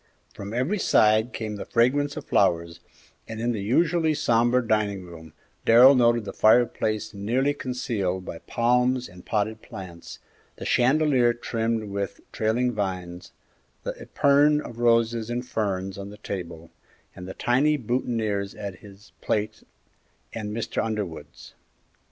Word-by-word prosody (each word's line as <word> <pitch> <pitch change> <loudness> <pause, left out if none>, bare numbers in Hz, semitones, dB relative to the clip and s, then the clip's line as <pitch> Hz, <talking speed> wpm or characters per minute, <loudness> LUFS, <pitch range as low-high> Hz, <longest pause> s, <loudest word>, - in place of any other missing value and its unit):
From 100 +1 -8
every 130 - -1
side 110 -4 +3
came 110 -2 -5
the - - -5
fragrance 145 +5 +1
of 150 - -6
flowers, 85 -3 +1 0.5
and 110 -1 -7
in 120 +1 0
the 110 -4 -3
usually 160 - +2
sombre 120 -2 +2
dining 105 -3 0
room 80 -3 -12 0.3
Darrell 125 +4 +8
noted 120 -3 +3
the - - -6
fireplace 110 -1 +2
nearly 120 +8 0
concealed 105 -9 -3
by 80 - -7
palms 125 +1 +1
and 90 0 -14
potted 110 +1 -1
plants, 85 -3 -10 0.4
the - - -8
chandelier 130 -2 +3
trimmed 115 -1 -2
with 100 0 -4
trailing 120 +3 0
vines, 90 -4 -4 0.5
the - - -3
epergne 145 +1 +3
of 120 -5 -8
roses 115 -1 +2
and 120 +1 -3
ferns 95 -3 -2
on 100 0 -7
the 105 - -11
table, 85 -5 -7 0.4
and 90 - -9
the 95 - -7
tiny 145 +5 +2
boutonnières 110 -5 -2
at 100 -4 -6
his 100 0 -16
plate 110 0 -2 0.7
and 110 -2 -5
Mr. 110 +2 -2
Underwood's. 105 -7 -6
110 Hz, 140 wpm, -25 LUFS, 100-125 Hz, 0.7 s, Darrell